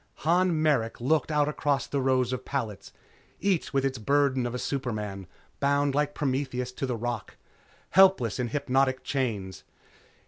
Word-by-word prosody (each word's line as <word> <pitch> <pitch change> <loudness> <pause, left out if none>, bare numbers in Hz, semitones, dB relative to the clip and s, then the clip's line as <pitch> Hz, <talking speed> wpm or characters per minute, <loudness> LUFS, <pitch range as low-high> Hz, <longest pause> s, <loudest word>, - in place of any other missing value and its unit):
Han 175 0 +3
Merrick 140 -8 +1
looked 150 +6 +1
out 150 -1 +2
across 145 -3 0
the 140 - -2
rows 130 -1 +1
of 130 0 -4
pallets, 115 -9 -4 0.5
each 195 -4 0
with 135 -1 +1
its 130 -2 -2
burden 135 +1 +2
of 120 - -5
a - - -1
superman, 110 -8 -4 0.3
bound 140 0 +2
like 145 +1 0
Prometheus 130 -3 -2
to 135 +1 -4
the 125 - -1
rock, 120 -1 -4 0.6
helpless 190 - +5
in 125 - 0
hypnotic 135 0 0
chains. 110 - -3
135 Hz, 150 wpm, -27 LUFS, 120-145 Hz, 0.6 s, helpless